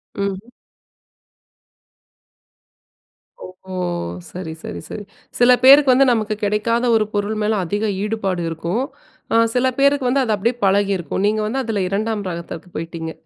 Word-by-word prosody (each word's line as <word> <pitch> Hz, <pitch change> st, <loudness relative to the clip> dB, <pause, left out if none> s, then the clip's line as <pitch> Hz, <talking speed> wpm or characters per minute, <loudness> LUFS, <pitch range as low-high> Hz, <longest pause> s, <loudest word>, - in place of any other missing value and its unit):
ம். 200 Hz, +3 st, -4 dB, 2.9 s
ஓஹோ! 185 Hz, +1 st, -12 dB, 0.6 s
சரி, 175 Hz, -3 st, -6 dB
சரி, 85 Hz, -, -6 dB
சரி. 210 Hz, -, -6 dB, 0.4 s
சில 245 Hz, +1 st, +6 dB
பேருக்கு 275 Hz, +1 st, +8 dB
வந்து 270 Hz, +1 st, +4 dB
நமக்கு 215 Hz, -2 st, 0 dB
கிடைக்காத 220 Hz, +4 st, +1 dB
ஒரு 215 Hz, -1 st, +2 dB
பொருள் 205 Hz, +1 st, -1 dB
மேல 215 Hz, -1 st, +1 dB
அதிக 205 Hz, +5 st, -2 dB, 0.2 s
ஈடுபாடு 195 Hz, -4 st, -2 dB
இருக்கும். 170 Hz, +9 st, -2 dB, 0.5 s
அ -, -, +3 dB, 0.2 s
சில 255 Hz, +1 st, +3 dB
பேருக்கு 280 Hz, -1 st, +3 dB
வந்து 270 Hz, +2 st, +2 dB
அது 225 Hz, -4 st, 0 dB
அப்படியே 230 Hz, +4 st, 0 dB
பழகியிருக்கும். 195 Hz, -2 st, +1 dB
நீங்க 215 Hz, +1 st, 0 dB
வந்து 265 Hz, +5 st, -1 dB
அதுல 220 Hz, -4 st, -2 dB
2 210 Hz, +1 st, -2 dB
ரகத்துக்கு 170 Hz, 0 st, -7 dB
போய்ட்டீங்க. 165 Hz, 0 st, -5 dB
210 Hz, 130 wpm, -20 LUFS, 190-235 Hz, 2.9 s, பேருக்கு